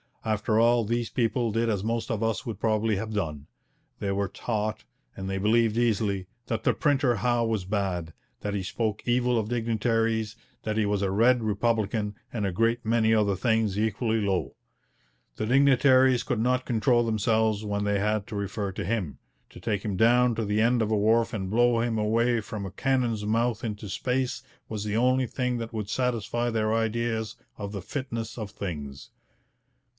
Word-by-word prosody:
After 110 0 +1
all, 120 0 +4
these 120 +2 -1
people 115 -1 0
did 115 +2 0
as 100 -3 -1
most 115 +2 -2
of 115 -2 -1
us 115 -2 0
would 110 -4 -5
probably 110 -1 +1
have 110 +3 -4
done. 75 -8 -3 0.5
They 100 - -1
were 100 0 0
taught, 105 - -3 0.3
and 95 0 -5
they 95 - -2
believed 110 +2 +2
easily, 105 -5 +1 0.2
that 115 - -2
the - - +3
printer 135 -5 +2
Howe 120 +3 +1
was 110 -5 -1
bad, 95 -5 -2 0.3
that 105 - -3
he 100 - -2
spoke 110 +3 -3
evil 125 0 +2
of 110 -1 -1
dignitaries, 115 -1 0 0.3
that 110 0 -2
he 110 - +2
was 100 -1 0
a 100 - +1
red 115 +4 +3
republican, 110 -1 0 0.2
and 110 -4 -1
a 95 - 0
great 115 +6 +1
many 110 0 +3
other 105 -3 +2
things 110 -1 +1
equally 110 +1 0
low. 95 -3 -1 0.8
The - - -2
dignitaries 130 -1 +5
could 125 -5 -1
not 125 +2 +1
control 120 +1 +2
themselves 110 -1 +1
when 100 -1 -2
they 100 -1 +1
had 105 0 0
to 115 - -7
refer 100 0 -3
to - - -4
him; 100 -9 -2 0.3
to - - -12
take 105 +2 -2
him 100 -4 -2
down 120 +3 +4
to 110 0 -2
the 105 +1 +1
end 120 +1 +3
of 110 - 0
a 110 - +3
wharf 115 +3 +3
and 95 -4 -3
blow 120 +2 +3
him 115 -1 0
away 115 +2 +2
from 105 -2 -6
a 95 - -6
cannon's 120 -4 0
mouth 115 +1 0
into 105 -2 -5
space 125 +3 -1 0.3
was 105 -2 -4
the 105 0 -1
only 130 +1 +3
thing 125 0 -1
that 115 -1 -5
would 105 -2 -4
satisfy 120 0 -1
their 110 -1 0
ideas 115 0 -1 0.2
of 100 -1 -5
the 100 -2 -5
fitness 115 -1 -5
of 110 -3 -5
things. 75 -9 -6
110 Hz, 185 wpm, -27 LUFS, 105-120 Hz, 0.8 s, dignitaries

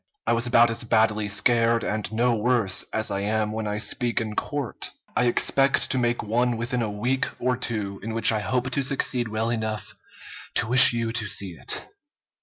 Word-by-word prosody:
I - - +2
was 120 +1 0
about 120 -1 +4
as 115 - -1
badly 110 -2 +1
scared, 115 +3 +2
and 105 0 -3
no 120 +2 +1
worse, 110 -3 +1
as 110 0 -3
I 100 - -2
am 105 +1 -1
when 110 0 -4
I 105 0 -3
speak 120 +2 0
in 110 -2 -5
court. 145 -1 -3 0.3
I 125 - +2
expect 135 +3 +2
to 130 - +1
make 120 -2 -1
one 120 +2 0
within 120 +2 -2
a 110 - -2
week 120 +6 -1
or 125 0 0
two 105 -5 -4
in 115 +2 -5
which 115 - +4
I 110 - 0
hope 125 +4 -2
to 140 - 0
succeed 130 -2 -1
well 110 +1 -2
enough 110 -2 -4 0.6
to - - +2
wish 125 +1 +8
you 115 -1 -2
to 110 -2 -2
see 100 -2 -1
it." 85 - -6
115 Hz, 200 wpm, -24 LUFS, 110-120 Hz, 0.6 s, wish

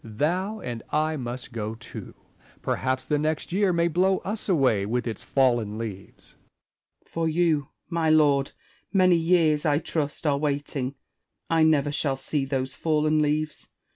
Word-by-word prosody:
Thou 175 - -1
and 120 -2 -5
I 155 +1 +1
must 125 -2 -5
go 110 -1 -3
too. 120 +2 -9 0.5
Perhaps 130 0 -1
the 150 +2 +1
next 155 +2 -2
year 195 +1 +2
may 170 -1 +2
blow 185 +3 +2
us 210 +2 -2
away 130 - +3
with 115 +4 -1
its 115 -2 -4
fallen 120 -6 +1
leaves, 105 -4 -7
Spenser. - - -28
For 165 -1 -1
you, 160 -4 +1 0.2
my 165 -2 0
lord, 145 -3 +3 0.4
many 185 -3 +5
years 165 -3 +3
(I 145 -2 +3
trust) 155 -1 -3
are 140 -2 +2
waiting: 140 -2 -2 0.6
I 165 -1 +4
never 150 -2 +3
shall 140 -2 0
see 135 +1 -2
those 130 -1 -2
fallen 155 +1 +1
leaves. 150 +1 -1
150 Hz, 155 wpm, -26 LUFS, 130-165 Hz, 0.6 s, many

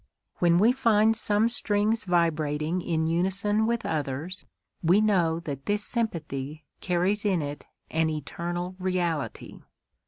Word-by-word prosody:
When 170 -1 +4
we 215 +6 +5
find 225 -4 +3
some 215 0 +2
strings 215 -1 +1
vibrating 160 -1 +1
in 160 -2 0
unison 195 +6 +1
with 235 0 -1
others, 155 +4 -3 0.3
we 180 +3 +4
know 180 -6 +2
that 140 -4 -6
this 205 0 +1
sympathy 155 - -3
carries 185 +3 0
in 190 -6 +1
it 145 0 -6 0.2
an 160 0 +1
eternal 175 +5 -4
reality. 175 -5 -2
175 Hz, 125 wpm, -27 LUFS, 160-210 Hz, 0.3 s, we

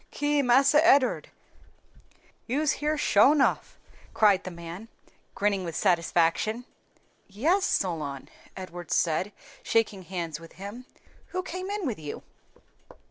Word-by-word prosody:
"Ki! 290 0 0
Marse 270 +2 +4
Ed'ard, 290 -4 +4 1.2
you's 285 +5 +1
here 305 +1 0
sho 270 0 +5
nuff!" 285 -3 0 0.4
cried 200 -3 +4
the - - -4
man, 170 +4 -9 0.5
grinning 200 -2 0
with 165 -2 -5
satisfaction. 175 +7 +1 0.6
"Yes, 315 - +1
Solon," 150 -7 -2 0.3
Edward 175 -2 -8
said, 175 +4 +1 0.3
shaking 215 -4 0
hands 170 -4 -5
with 165 0 -14
him. 205 +7 -9 0.4
"Who 370 0 -4
came 370 +2 -6
in 410 -2 -3
with 235 - -3
you?" 150 -2 -7
210 Hz, 120 wpm, -27 LUFS, 175-285 Hz, 1.2 s, sho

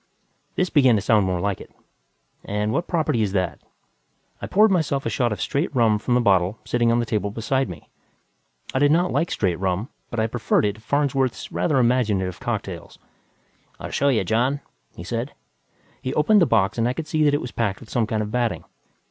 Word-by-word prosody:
This 185 0 0
began 130 -7 +5
to 105 - +1
sound 110 -3 +3
more 90 -1 -1
like 100 +1 -2
it. - - -12 0.7
"And 105 +1 -2
what 170 - -1
property 155 -9 0
is 100 -3 -1
that?" 90 -3 -1 0.8
I - - -4
poured 215 +1 +4
myself 150 -7 0
a 115 - -1
shot 120 +2 0
of 105 - -3
straight 145 - -1
rum 110 -4 +3
from 120 +3 0
the - - +4
bottle 95 -1 +2
sitting 120 -1 +1
on 115 - +3
the 120 - 0
table 105 -3 -1
beside 115 +4 -1
me. 80 -5 -10 0.9
I 130 - +1
did 145 +1 +4
not 175 +3 +2
like 165 - 0
straight 90 -5 0
rum, 95 +4 -1 0.2
but 115 - -4
I 110 - +2
preferred 115 -1 +1
it 105 - 0
to 110 - -16
Farnsworth's 135 0 -1
rather 150 -5 0
imaginative 110 -7 +1
cocktails. - - -5 0.8
"I'll - - -7
show 140 - +2
you, 115 -7 +2
John," 125 +8 0 0.3
he 85 - -8
said. 115 +8 -4 0.7
He 130 - -3
opened 200 +7 +4
the 170 - +4
box 105 -1 +1
and 115 +1 +2
I - - -1
could 160 +4 -5
see 155 0 0
that 145 -1 +4
it 145 - -1
was 120 - -6
packed 100 -4 -1
with 115 - -14
some 115 -3 +1
kind 110 -1 -1
of 105 - -6
batting. 120 -1 -1
115 Hz, 210 wpm, -23 LUFS, 105-140 Hz, 0.9 s, began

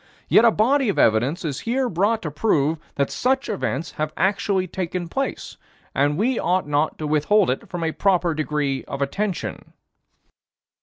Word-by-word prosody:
Yet 230 - +5
a - - +8
body 250 +4 +2
of 200 - -1
evidence 125 +11 +2
is 140 -4 -3
here 255 +3 0
brought 210 +3 0
to 155 - -3
prove 155 -3 +1 0.2
that 140 -1 0
such 265 +2 0
events 170 -6 -2
have 155 0 -3
actually 195 0 +1
taken 180 -1 -4
place, 270 +10 -4 0.4
and 145 +2 +1
we 235 +5 +1
ought 180 -1 0
not 150 +1 0
to 155 - -4
withhold 150 +1 +1
from 175 -2 -4
it 160 - +1
a - - -13
proper 180 -4 +2
degree 150 -3 -1
of 140 0 -3
attention." 195 +7 -4
175 Hz, 165 wpm, -22 LUFS, 150-210 Hz, 0.4 s, a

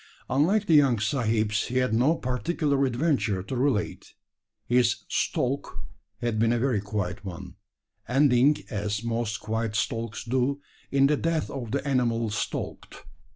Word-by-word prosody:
Unlike 185 +11 +3
the 170 - +2
young 140 -5 +5
sahibs, 110 -2 0
he 125 - -2
had 125 -3 +1
no 130 +8 +3
particular 140 +2 0
adventure 125 - 0
to 100 - -5
relate. 125 -5 -1 0.5
His 125 0 +2
"stalk" 130 +2 -1 0.4
had 120 -2 -1
been 115 +1 +3
a 120 - +2
very 120 -4 +1
quiet 100 -2 -3
one 90 -3 -7 0.5
ending, 135 +1 +4
as 105 0 -2
most 115 -2 -2
quiet 110 0 -2
stalks 115 -1 -2
do, 130 +3 0 0.3
in 140 0 +4
the 145 +1 +3
death 165 0 -1
of 125 -5 -5
the 140 +4 -2
animal 115 -4 +1
stalked. 105 - -5
120 Hz, 145 wpm, -26 LUFS, 110-140 Hz, 0.5 s, young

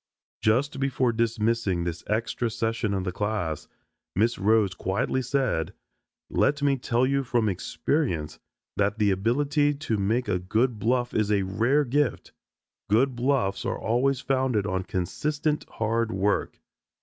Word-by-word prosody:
Just 130 +6 +1
before 130 -3 +1
dismissing 115 -5 0
this 85 -1 -4
extra 115 +2 -1
session 115 -2 -1
of 95 - -1
the 90 - -2
class, 105 -6 -2 0.5
Miss 115 +5 +2
Rhodes 105 -1 +3
quietly 115 +9 -1
said, 130 - -1 0.5
"Let 145 0 +1
me 140 -1 +3
tell 120 +1 +1
you 140 +1 +1
from 120 -3 +1
experience 90 - -1 0.4
that 105 +2 +1
the 105 -2 +3
ability 145 +9 +1
to 140 -7 -2
make 110 +5 0
a 90 -3 0
good 110 +5 0
bluff 120 +3 0
is 105 -1 +1
a 100 -2 +2
rare 115 +10 +2
gift. 140 -1 0 0.6
Good 125 +5 +3
bluffs 125 -5 0
are - - -2
always 130 +4 +1
founded 130 -7 +1
on 95 -2 -2
consistent 150 - -2
hard 115 +1 -1
work." 100 0 0
115 Hz, 140 wpm, -26 LUFS, 100-130 Hz, 0.6 s, Rhodes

